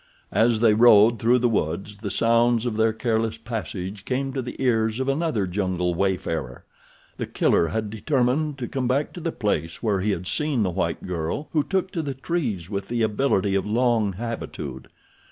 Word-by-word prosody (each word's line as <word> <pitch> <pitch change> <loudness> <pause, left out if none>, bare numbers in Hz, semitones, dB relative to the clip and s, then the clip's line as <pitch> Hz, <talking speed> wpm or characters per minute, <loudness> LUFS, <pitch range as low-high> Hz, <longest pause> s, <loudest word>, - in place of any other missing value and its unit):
As 115 -1 +3
they 115 -2 +5
rode 110 0 +6
through 120 +2 +4
the 120 0 +2
wood 95 -5 -1 0.2
the 105 - -3
sounds 115 +2 +2
of 120 -3 -1
their 110 +1 +3
careless 110 0 -1
passage 105 -4 -5
came 135 +3 -2
to 135 - -1
the 125 - -7
ears 115 -3 +1
of 130 - -1
another 135 - 0
jungle 90 -1 -1
wayfarer. 85 -8 -2 0.5
The - - -3
Killer 85 - +2
had 105 +5 -3
determined 135 +5 0
to 125 -3 -4
come 130 -2 -2
back 135 +4 0
to - - -7
the 165 0 -2
place 90 - -2
where 105 -4 +1
he 105 - 0
had 90 -3 -2
seen 145 +2 0
the 95 - 0
white 95 - -2
girl 90 - -3
who 150 -3 +2
took 190 +4 -1
to 170 - -2
the 140 -3 -4
trees 125 - -2
with 100 0 -4
the 120 -1 0
ability 105 -3 +1
of 100 +1 0
long 115 -2 +2
habitude. 115 +4 -6
115 Hz, 190 wpm, -24 LUFS, 100-125 Hz, 0.5 s, rode